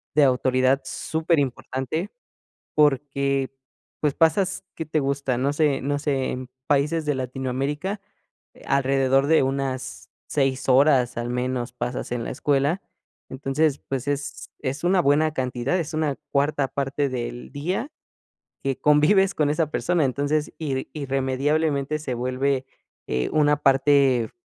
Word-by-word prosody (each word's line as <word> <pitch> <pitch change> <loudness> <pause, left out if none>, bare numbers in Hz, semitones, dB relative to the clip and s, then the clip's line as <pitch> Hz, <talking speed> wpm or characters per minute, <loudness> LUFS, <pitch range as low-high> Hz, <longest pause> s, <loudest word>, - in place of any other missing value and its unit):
de 150 - +6
autoridad 130 0 +3
superimportante, 155 - -1 0.7
porque, 140 -2 +2 0.5
pues, 150 -2 +1
pasas, 185 +4 +2
¿qué 160 - -5
te 155 0 0
gusta? 140 -2 -1
No 135 +3 +1
sé 145 -3 +1
no 145 +1 0
sé, 140 -3 -1
en 130 0 -5 0.2
países 150 +3 +1
de 150 -1 0
Latinoamérica, 135 - -3 0.5
eh, - - -17
alrededor 135 0 +2
de 160 -1 +4
unas 130 -1 -3 0.2
6 135 -2 0
horas, 130 -2 +4
al 120 - -3
menos, 125 0 -2
pasas 125 +1 -4
en 120 -1 -2
la - - -5
escuela. 145 +7 +1 0.5
Entonces, 135 +2 0
pues, 135 0 -3
es 145 0 -3
es 140 +2 -3
una 185 +1 +4
buena 155 +2 +3
cantidad, 130 +5 -1
es 160 -3 -3
una 155 -3 0 0.2
cuarta 140 -1 +1
parte 140 +1 -1
del 120 0 -5
día 180 - -2 0.7
que 135 -1 -1
convives 185 +7 +4
con 150 -2 +2
esa 155 0 +1
persona. 170 -4 +1
Entonces, 145 +3 -1
irri 135 -4 -3
irremediablemente 140 +2 0
se 140 -4 -4
vuelve, 130 +2 0 0.4
eh, 65 0 -1
una 150 -1 +4
parte, 135 -4 +3
140 Hz, 135 wpm, -24 LUFS, 130-150 Hz, 0.7 s, de